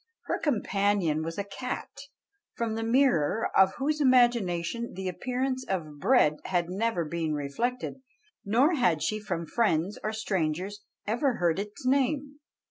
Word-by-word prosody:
Her - - -2
companion 200 - +1
was 165 +1 -5
a 200 - -1
cat, 200 +6 -5 0.6
from 230 -2 -2
the 225 - -3
mirror 225 - +2
of 190 0 +5
whose 300 +2 -1
imagination 235 -5 +2
the 190 0 -4
appearance 255 +7 -2
of 155 -6 -3
bread 185 - +4
had 175 -1 0
never 195 -3 0
been 160 -1 -2
reflected, 240 - -3 0.4
nor 245 - +3
had 205 - +2
she 215 - 0
from 175 -5 -3
friends 190 -1 0
or 215 - -1
strangers 190 -2 -2 0.2
ever 240 +4 +1
heard 175 -3 +1
its 205 +4 -7
name. 280 +2 +1
205 Hz, 140 wpm, -28 LUFS, 170-250 Hz, 0.6 s, of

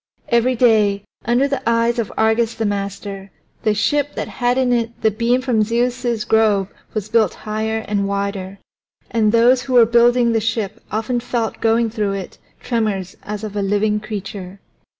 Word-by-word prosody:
Every 235 +2 +2
day, 215 -4 +3 0.2
under 245 +4 +2
the 275 0 -2
eyes 230 +1 +2
of 225 - -2
Argus 220 +1 +2
the 225 - -2
master, 200 -1 -4 0.3
the 215 -1 +1
ship 290 +6 0
that - - -3
had 245 0 0
in 255 -2 +2
it 235 -1 -2
the 220 - +4
beam 235 +4 +1
from 245 -4 +1
Zeus's 240 +1 0
grove 210 -3 +2 0.3
was 215 -1 -2
built 225 0 +2
higher 220 +1 -2
and 200 -1 0
wider. 200 -1 -3 0.5
And 220 -2 +2
those 240 +3 +4
who 260 0 -4
were 240 -2 +7
building 235 +1 +4
the 225 -1 +1
ship 220 -2 -2
often 225 +4 -1
felt 235 -2 -3
going 225 0 +2
through 210 -3 -1
it 195 -2 -7 0.2
tremors 210 -6 -2
as 210 +1 -6
of 210 -1 -6
a 205 - 0
living 205 +2 +1
creature. 200 -3 -7
220 Hz, 170 wpm, -19 LUFS, 205-235 Hz, 0.5 s, were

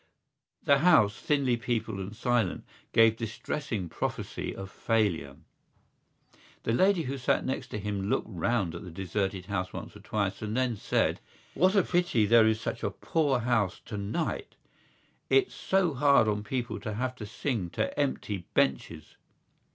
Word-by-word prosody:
The 140 -1 +4
house, 130 -12 +5
thinly 135 -5 +1
peopled 115 -3 -2
and 95 +3 -6
silent, 120 -6 0 0.3
gave 115 -1 +5
distressing 115 - -3
prophecy - - -4
of 95 0 -8
failure. 100 -11 0 1.3
The 115 - 0
lady 185 +5 +3
who 135 0 -4
sat 125 - +1
next 130 - -3
him 100 -1 -3
looked - - +1
round 100 -1 -1
at 85 - -7
the 90 - -8
deserted 95 +2 -3
house 90 -1 -2
once - - -7
or - - -11
twice 100 -2 -2
and 110 +2 -3
then 130 -2 +1
said: - - 0 0.3
"What 185 +3 +3
a 195 - +5
pity 175 -13 +2
there 110 +1 +6
is 110 0 +2
such - - -4
a - - 0
poor 145 -6 0
house 110 -6 +1
tonight! 110 - -3 0.7
It's 400 -1 +3
so 190 -4 +1
hard 140 -4 +4
on 105 -1 0
people 120 +1 -3
to 110 -2 -5
have 125 +3 -2
to 105 - -7
sing 105 -2 -2
to 110 - 0
empty 105 -9 -2
benches." 75 +3 0
110 Hz, 155 wpm, -29 LUFS, 100-130 Hz, 1.3 s, there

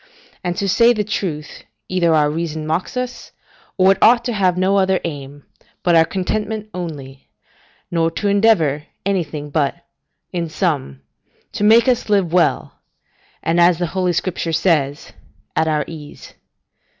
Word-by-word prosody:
And 175 0 -2
to 200 - -1
say 235 +5 +5
the 215 -2 -1
truth, 170 -8 -4 0.2
either 180 -2 +1
our 150 -2 +4
reason 155 0 -3
mocks 160 +9 -2
us, 250 0 -5 0.4
or 190 0 +5
it 195 - 0
ought 235 +1 +5
to 245 - -1
have 185 -4 +1
no 190 +2 +2
other 190 -1 +2
aim 145 -3 -7 0.4
but 175 - +3
our 165 -1 +6
contentment 210 +4 -3
only, 140 -7 -7 0.6
nor 165 -1 +1
to 185 +5 -3
endeavour 185 -9 +2 0.2
anything 155 -7 -2
but, 145 -2 0 0.6
in 170 -2 -2
sum, 145 - -2 0.5
to - - -4
make 225 +3 +6
us 245 -4 +1
live 195 -5 +2
well, 180 -1 +1 0.6
and, 165 +1 +1
as 175 -1 +5
the 175 - -1
Holy 185 -2 0
Scripture 170 -1 -2
says, 150 -4 0 0.4
at 160 - +1
our 150 -1 0
ease. 150 -3 -11
175 Hz, 150 wpm, -19 LUFS, 155-200 Hz, 0.6 s, our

